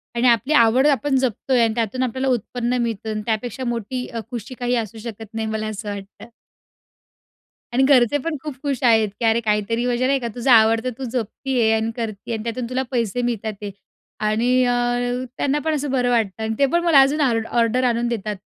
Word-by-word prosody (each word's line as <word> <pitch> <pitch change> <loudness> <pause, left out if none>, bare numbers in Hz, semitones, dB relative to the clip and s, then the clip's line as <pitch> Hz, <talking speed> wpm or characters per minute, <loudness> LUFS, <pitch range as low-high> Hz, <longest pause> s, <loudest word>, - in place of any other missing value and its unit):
आणि 240 +2 +2
आपली 240 +5 +3
आवड 255 +1 +5
आपण 290 -1 +1
जपतोय 255 0 +1
आणि 225 -1 +1
त्यातून 235 +2 -1
आपल्याला 260 +2 -2
उत्पन्न 245 +1 -2
मिळतं 225 -2 -3
अन् 215 - -3
त्यापेक्षा 235 +3 -2
मोठी 240 +1 -3
अ, 230 - -6
खुशी 245 +2 -6
काही 245 0 0
असू 225 -2 -3
शकत 225 -1 -8
नाही 220 0 -3
मला 220 0 -3
असं 215 0 -5
वाटतं. 200 0 -8 1.5
आणि 265 - +3
घरचे 265 -1 +4
पण 330 -2 -1
खूप 300 -3 -5
खुश 275 -4 -2
आहेत 220 -3 +4
की 235 - -1
अरे, 225 +1 +3
काहीतरी 220 +2 0
म्हणजे 250 +1 +1
नाही 275 0 +2
का, 240 - -4
तुझं 245 +2 +1
आवड 225 -1 +5
तर 255 - -1
तू 270 - -6
जपते 255 +2 -2
आहे 220 - +3
आणि 220 +1 0
करती 220 -3 -5
आहे - - 0
आणि 215 - -7
त्यातून 235 +2 -3
तुला 255 +1 -1
पैसे 240 -1 -1
मिळत 235 -3 -2
आहेत. 210 -1 -5 0.5
आणि 235 +4 +2
अ, 245 - +2 0.6
त्यांना 285 +1 0
पण 315 -1 +1
असं 290 -1 -2
बरं 250 -2 +1
वाटतं 225 -3 0
अन् 220 0 -1
ते 280 - +5
पण 345 - +2
मला 330 -5 +6
अजून 285 +3 +2
ऑर्ड 230 -5 +1
ऑर्डर 235 +2 +1
आणून 240 -1 +1
देतात. 215 -3 -3
235 Hz, 210 wpm, -21 LUFS, 220-255 Hz, 1.5 s, मला